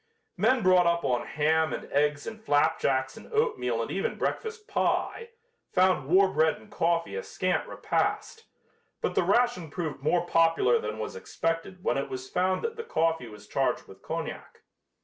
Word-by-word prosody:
Men 245 +1 +2
brought 180 -1 +5
up 170 -2 +1
on 125 -2 0
ham 160 +1 +2
and - - -4
eggs 145 0 +1
and 220 -1 -8
flapjacks 135 -5 +1
and - - -13
oatmeal 450 0 0
and - - -6
even 470 - -2
breakfast 445 -1 -3
pie, 460 +1 -1 0.4
found 185 -7 +3
war 190 +5 +5
bread 160 -4 +2
and 210 - -17
coffee 170 -3 0
a 470 - -2
scant - - -1
repast, 450 0 -2 0.6
but - - -1
the - - +3
ration 240 -9 +2
proved 155 -3 -4
more 170 +4 +1
popular 165 -7 +3
than 105 +1 -4
was 110 - -5
expected 165 - -3
when - - +1
it 140 - -4
was 130 0 -6
found 185 +5 0
that 460 0 -3
the 460 - -4
coffee 165 - 0
was 105 -1 -12
charged - - -1
with - - -14
cognac. - - -6
170 Hz, 170 wpm, -28 LUFS, 145-215 Hz, 0.6 s, brought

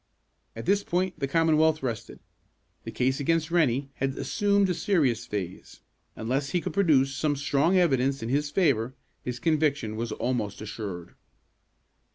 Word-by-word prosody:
At 115 - -7
this 200 +2 +2
point 185 +1 -1
the 135 - -1
Commonwealth 160 0 +3
rested. 115 -4 -4 0.7
The - - -5
case 130 +1 0
against 165 +3 0
Rennie 140 -5 +1
had 135 0 -2
assumed 200 -2 +2
a - - +1
serious 140 - +1
phase. 95 -5 -6 0.3
Unless 135 +5 -2
he 180 - +1
could 155 - -5
produce 145 -8 +3
some 150 +1 0
strong 145 +6 +2
evidence 135 -6 +2
in 115 - -3
his 145 +3 0
favor, 135 - +1 0.3
his 125 -1 -4
conviction 145 -8 0
was 115 +1 -3
almost 115 -4 -2
assured. 105 -5 -6
140 Hz, 150 wpm, -27 LUFS, 120-165 Hz, 0.7 s, Commonwealth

